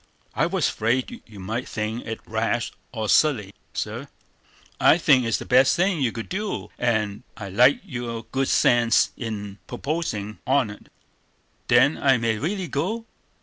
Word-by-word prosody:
"I - - +1
was - - +1
afraid 120 +4 -1
you 105 -3 -12
might 110 +6 -4
think 110 +2 -4
it 110 0 -5
rash 115 +1 -1 0.2
or 110 -3 -3
silly, 105 -8 +3 0.2
sir." - - -4 0.7
"I - - +6
think 135 -7 +4
it's 115 - +1
the - - -7
best 130 +1 +5
thing 180 -2 +1
you 125 -4 +2
could 115 - -6
do; 205 +2 -4
and 110 -3 0 0.2
I 100 -3 -6
like 125 +8 +4
your 120 - -5
good 135 +4 -2
sense 120 -1 +4
in 105 -4 -6
pupposin' 120 -7 -3
on't." 130 -6 0 0.8
"Then 130 +5 +4
I 135 -2 +4
may 115 -2 0
really 185 - -2
go?" 195 +12 -2
120 Hz, 150 wpm, -24 LUFS, 110-140 Hz, 0.8 s, I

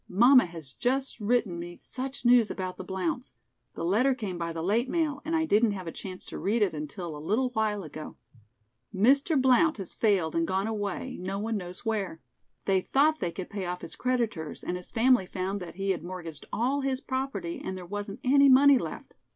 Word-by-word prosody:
"Mamma 245 +6 +6
has 160 -6 -8
just 265 +2 -1
written 210 -5 +1
me 175 0 -7
such 265 +4 -6
news 240 -2 +6
about 185 -1 -4
the - - -6
Blounts. 190 +5 -3 0.4
The 165 - -3
letter 245 +9 +3
came 210 -7 -4
by 170 0 -2
the 165 0 -4
late 225 +8 +1
mail 300 -4 0
and 330 - -1
I 320 0 +2
didn't 215 -5 +3
have 190 -2 -6
a 165 - -4
chance 185 +2 -8
to - - -7
read 215 +3 +2
it 195 - 0
until 155 +2 -5
a - - -7
little 245 +9 +1
while 215 -3 0
ago. 155 -1 -8 0.7
Mr. 275 - +3
Blount 265 +4 +4
has 195 -4 -7
failed 195 -8 +2
and 165 0 +1
gone 190 +1 0
away, 220 +4 -3
no 190 +2 -3
one 220 +2 -2
knows 180 +1 -7
where. 205 -7 -2 0.5
They 190 -1 +3
thought 305 +8 +2
they 170 - -1
could 180 +2 -7
pay 200 -2 -3
off 180 0 -4
his - - -8
creditors 235 -11 -2
and 180 - -2
his 180 0 -8
family 240 -4 +3
found 190 +2 -3
that 180 -3 -8
he 195 +1 0
had 175 -4 -3
mortgaged 175 -3 -7
all 260 +5 0
his 265 -1 -1
property 275 +6 -3
and 190 - -4
there 180 - -8
wasn't 205 +2 -5
any 280 +2 +6
money 270 0 +7
left." - - -7
205 Hz, 210 wpm, -28 LUFS, 180-255 Hz, 0.7 s, money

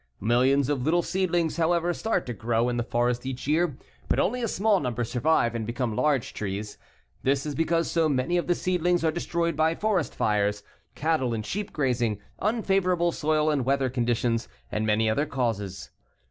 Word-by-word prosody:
Millions 125 +5 +3
of 145 -3 0
little 165 +6 +2
seedlings, 175 -3 0
however, 170 +1 +2
start 225 +6 -1
to 120 - -4
grow 115 +2 0
in 120 - -1
the 120 - 0
forest 120 +1 0
each 130 -1 -5
year, 155 -1 +1 0.3
but - - +2
only 250 +5 +1
a 230 - 0
small 205 -1 +2
number 120 -4 -2
survive 120 +1 +1
and 110 -2 -3
become 120 -2 -2
large 140 -1 +1
trees. 105 +1 -5 0.4
This 135 +1 +1
is 150 - -3
because 165 +3 0
so 165 -2 +2
many 135 +4 0
of 175 - -1
the 175 - +2
seedlings 175 -1 +1
are 160 - +3
destroyed 170 0 -1
by 160 +2 +2
forest 205 -6 0
fires, 105 -1 0 0.3
cattle 145 -6 0
and 110 -1 -4
sheep 210 +1 -4
grazing, 120 -7 0 0.2
unfavorable 190 -5 +1
soil 155 -1 +1
and 140 -4 0
weather 135 0 +1
conditions, 120 -1 0 0.2
and 110 +1 -1
many 110 +1 +2
other 140 +8 +1
causes. 115 -9 -3
140 Hz, 180 wpm, -26 LUFS, 120-170 Hz, 0.4 s, Millions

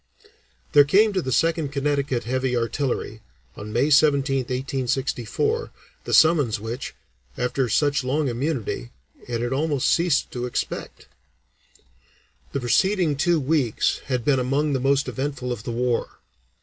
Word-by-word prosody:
There 145 - +8
came 205 +9 +3
to 185 - 0
the 130 - -4
Second 160 +1 +1
Connecticut 140 -3 -1
Heavy 130 +1 -1
Artillery, 115 -2 -2 0.3
on 105 +1 -8
May 130 +7 +1
17, 140 -2 +4
1864, 130 - -2 0.4
the - - -3
summons 150 -10 +4
which, 115 +5 -6 0.4
after 125 0 -1
such 145 +4 +1
long 140 +3 0
immunity, 120 - -3 0.4
it 120 -1 -2
had 120 +2 -1
almost 145 -1 0
ceased 170 -4 +1
to 125 0 -3
expect. 125 - -5 1.5
The 140 - -2
preceding 175 - +2
two 170 +3 +2
weeks 140 -5 0
had 125 -3 -2
been 135 -3 +3
among 140 +4 0
the 135 - 0
most 140 +2 +1
eventful 135 -2 -3
of 120 -2 -5
the - - -4
war. 120 0 -1
135 Hz, 135 wpm, -23 LUFS, 125-150 Hz, 1.5 s, There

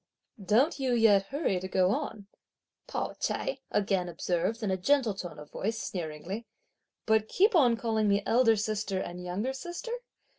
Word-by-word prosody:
"Don't 255 - +3
you 260 -2 +1
yet 205 -4 +5
hurry 275 - 0
to 185 - -5
go 185 0 +2
on," 225 -6 -3 0.6
Pao - - -3
ch'ai - - -2
again 195 -3 0
observed 175 +6 -1
in 200 - 0
a - - +2
gentle 245 +3 +2
tone 180 -3 -7
of 150 0 -11
voice 220 +2 -2
sneeringly, 175 +6 -5 0.6
"but 220 -1 +3
keep 410 - +3
on 250 -9 +5
calling 220 -2 0
me 200 0 +2
elder 230 -1 +4
sister 210 -2 -1
and 180 -1 -5
younger 200 +9 -2
sister? 345 - -6
215 Hz, 160 wpm, -29 LUFS, 190-245 Hz, 0.6 s, yet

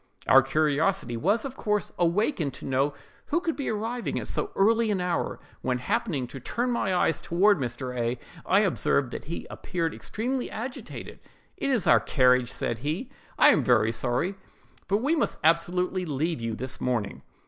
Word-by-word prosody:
Our 135 - +8
curiosity 150 +2 +1
was, 200 - +1
of 265 -1 -5
course, 210 -5 -1
awakened 175 - +1
to - - -10
know 135 +2 +1 0.3
who 335 - +1
could 335 -3 -2
be 280 - -3
arriving 225 +3 -2
at - - -5
so 415 - -2
early 225 +3 +3
an 200 -3 +1
hour; 180 -1 -1 0.2
when, 125 -1 0
happening 180 - -1
to 135 - -8
turn 240 - -2
my 235 -5 0
eyes 175 -3 +1
toward 195 +2 +3
Mr. 125 0 -4
A——, 120 0 -1 0.3
I 195 +2 +4
observed 145 - +1
that - - -6
he 170 - -5
appeared 165 -2 -3
extremely 250 +4 -3
agitated. 245 +4 -7 0.4
'It - - -2
is 245 -9 +1
our - - +6
carriage!' 125 -2 +3
said 115 - -3
he; 160 - -3 0.3
'I 295 - +7
am - - +4
very 115 -3 +4
sorry, 120 - -1 0.5
but 205 +4 +1
we 295 +4 +2
must 305 - 0
absolutely 180 +3 +2
leave 155 0 -1
you 115 -1 -2
this 130 +3 -5
morning. 115 -6 -1
170 Hz, 175 wpm, -27 LUFS, 130-215 Hz, 0.5 s, Our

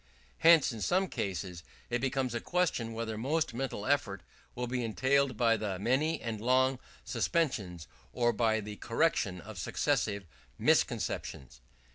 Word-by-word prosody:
Hence 165 -4 +6
in 115 -2 -7
some 185 - +2
cases 90 -2 -4 0.3
it 120 0 0
becomes 130 -2 -1
a 120 - -1
question 165 -11 0
whether 110 -1 -4
most 150 +2 0
mental 120 -4 -3
effort 105 -10 0 0.3
will 125 - -2
be 125 0 -2
entailed 130 +2 +1
by 115 -1 +3
the 100 -3 -3
many 130 - +1
and 110 -2 -4
long 130 +2 +3 0.3
suspensions, 105 - -1 0.2
or 120 -1 +1
by 110 -1 +1
the 105 0 -7
correction 115 - 0
of 105 -1 -9
successive 105 -4 0 0.3
misconceptions. 65 -2 0
120 Hz, 140 wpm, -31 LUFS, 105-135 Hz, 0.3 s, Hence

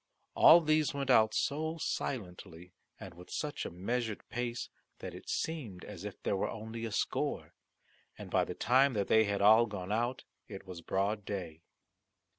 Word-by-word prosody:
All 170 +2 +8
these 155 -2 +1
went 140 -1 0
out 110 0 +5
so 160 +3 -1
silently, 90 - -5 0.3
and 95 -2 -9
with 90 +1 -14
such 150 -1 -3
a - - -6
measured 110 +5 -3
pace, 120 0 -3 0.3
that - - -7
it - - -11
seemed 125 - -3
as 100 -3 -9
if 105 -1 -8
there - - 0
were 95 - -1
only 115 +1 -6
a 115 - -5
score. - - -2 0.6
And - - -9
by - - +3
the - - -6
time 130 +3 +3
that 100 -3 -1
they 110 0 +5
had 100 -1 -1
all 110 +3 +7
gone 100 -2 -6
out 120 +4 -1 0.2
it 95 - -9
was 90 -3 -8
broad 100 +4 -1
day. 90 -6 -6
110 Hz, 175 wpm, -32 LUFS, 95-125 Hz, 0.6 s, All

